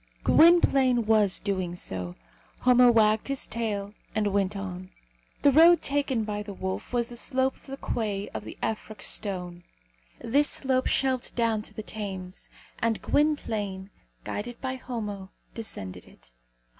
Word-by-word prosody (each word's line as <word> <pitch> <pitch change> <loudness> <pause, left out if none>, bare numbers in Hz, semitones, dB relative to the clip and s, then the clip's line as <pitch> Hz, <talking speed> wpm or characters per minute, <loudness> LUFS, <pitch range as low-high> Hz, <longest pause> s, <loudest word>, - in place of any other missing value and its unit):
Gwynplaine 270 -8 +5
was 210 -3 +4
doing 185 -3 -2
so. 90 - -4 0.5
Homo 250 -1 +6
wagged 215 -2 +3
his 275 -1 0
tail, 210 -3 -3 0.2
and 210 -2 +1
went 200 0 +1
on. 185 -1 -6 0.5
The 285 - +7
road 330 +3 +7
taken 275 -5 +1
by 210 -1 -3
the 205 -1 -8
wolf 190 0 -4
was 240 -1 0
the 240 - -7
slope 260 +2 0
of - - -16
the 270 0 -6
quay 210 -6 -2
of - - -6
the - - -9
Effroc 215 -1 -4
stone. 180 -4 -4 0.5
This 285 +5 +2
slope 260 -1 0
shelved 260 -2 0
down 230 -2 +1
to - - -9
the 215 - -5
Thames; 190 -4 -6 0.3
and 225 -1 0
Gwynplaine, 210 -10 0 0.3
guided 235 - -5
by 260 -1 -3
Homo, 210 -7 -5 0.2
descended 95 - -6
it. - - -20
220 Hz, 145 wpm, -27 LUFS, 195-255 Hz, 0.5 s, The